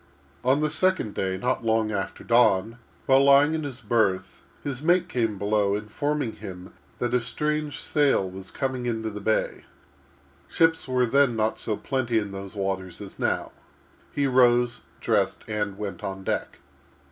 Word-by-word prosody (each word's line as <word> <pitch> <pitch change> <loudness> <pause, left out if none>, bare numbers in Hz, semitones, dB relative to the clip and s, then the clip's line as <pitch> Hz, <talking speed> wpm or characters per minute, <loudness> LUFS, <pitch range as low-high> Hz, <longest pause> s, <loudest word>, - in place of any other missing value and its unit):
On 130 +4 +3
the 155 -1 +1
second 185 - +1
day, 95 -1 -2
not 125 +4 -1
long 110 -1 +1
after 95 -1 -4
dawn, 115 -1 +3 0.3
while 135 0 +5
lying 140 +2 +6
in 160 - -1
his 130 -3 -5
berth, 105 -6 0 0.2
his 135 -2 -4
mate 175 +3 +3
came 115 -4 -1
below, 100 0 +1
informing 125 +5 -2
him 95 -2 -9 0.2
that 120 -1 -2
a 125 - +3
strange 150 +5 -2
sail 140 -10 +2
was 95 +1 -9
coming 130 -2 -3
into 110 -2 -2
the 105 0 -7
bay. 110 +2 -1 0.8
Ships 165 -3 +2
were 125 -1 +2
then 135 0 +3
not 110 0 0
so 105 -2 -2
plenty 130 -4 -1
in 105 -2 -1
those 100 +1 -8
waters 95 -3 -3
as 100 -2 -10
now. - - -1 0.6
He 145 - 0
rose, 120 -2 +3 0.2
dressed, 100 -4 +1
and 105 -2 -2
went 100 -4 -6
on 95 0 -5
deck. - - -3
115 Hz, 160 wpm, -25 LUFS, 100-135 Hz, 0.8 s, lying